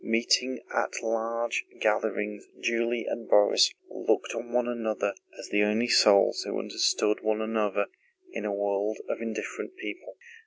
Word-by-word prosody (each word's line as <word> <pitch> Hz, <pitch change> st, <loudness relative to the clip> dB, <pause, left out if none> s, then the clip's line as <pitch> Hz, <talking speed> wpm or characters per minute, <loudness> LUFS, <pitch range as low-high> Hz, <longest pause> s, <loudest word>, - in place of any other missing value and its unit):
Meeting 120 Hz, +3 st, +1 dB
at -, -, -1 dB
large 115 Hz, +1 st, -1 dB, 0.2 s
gatherings 105 Hz, 0 st, -1 dB
Julie 115 Hz, 0 st, 0 dB
and 115 Hz, -, -5 dB
Borís 105 Hz, 0 st, +5 dB, 0.2 s
looked -, -, -1 dB
on 120 Hz, -, -6 dB
one 120 Hz, 0 st, +1 dB
another 110 Hz, -4 st, -1 dB, 0.2 s
as -, -, -9 dB
the 105 Hz, -, +2 dB
only 105 Hz, +3 st, +2 dB
souls 100 Hz, -3 st, +5 dB
who -, -, -3 dB
understood 105 Hz, -, +1 dB
one 110 Hz, 0 st, 0 dB
another 110 Hz, -2 st, 0 dB, 0.5 s
in -, -, -5 dB
a 105 Hz, -, -1 dB
world 100 Hz, +1 st, -1 dB
of -, -, -3 dB
indifferent 115 Hz, -, -5 dB
people. 370 Hz, -1 st, -8 dB
110 Hz, 145 wpm, -28 LUFS, 105-115 Hz, 0.5 s, Borís